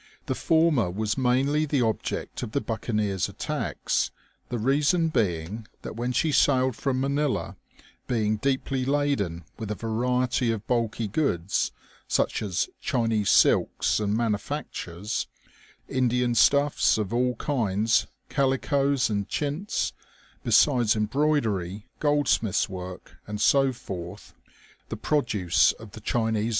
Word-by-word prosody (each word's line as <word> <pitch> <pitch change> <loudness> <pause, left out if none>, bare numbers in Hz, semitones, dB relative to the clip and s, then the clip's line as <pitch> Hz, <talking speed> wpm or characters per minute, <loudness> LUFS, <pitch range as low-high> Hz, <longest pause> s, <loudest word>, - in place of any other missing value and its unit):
The - - -1
former 160 - +2
was 105 +3 -1
mainly 135 +4 +2
the 140 -4 +1
object 110 -2 -2
of 105 - -5
the - - +2
buccaneers* 105 -5 -1
attacks, - - -2 0.4
the 125 - -2
reason 150 - +2
being 100 - -1 0.2
that - - -6
when 120 +2 -2
she 125 +6 +1
sailed 130 -3 +3
from 130 0 -1
Manila, 140 +1 -1 0.5
being 110 -4 +1
deeply 135 +2 -1
laden 130 - 0
with 110 -3 -5
a 105 - -2
variety 125 +2 0
of 110 -1 -4
bulky 115 -2 -1
goods, 100 - 0 0.4
such - - 0
as 95 -4 -1
Chinese 115 -4 0
silks - - +3
and 105 0 0
manufactures, 105 - -3 0.6
Indian 125 -1 +1
stuffs 140 +2 +4
of 105 -1 -2
all 125 +1 +1
kinds, 110 -5 +1 0.2
calicoes 135 0 +1
and 100 -2 -2
chintz, 150 +7 -2 0.5
besides 120 -8 +4
embroidery, 105 - 0
gold 145 -2 +2
smiths' 110 -5 +2
work, 90 -1 -8
and 105 0 -5
so 135 +4 +4
forth, 95 -5 -8 0.6
the - - -4
produce 110 - +2
of 110 -2 -13
the 110 - -11
Chinese 110 -1 0
OLD - - 0
SHirS. - - -1
120 Hz, 130 wpm, -26 LUFS, 105-140 Hz, 0.6 s, stuffs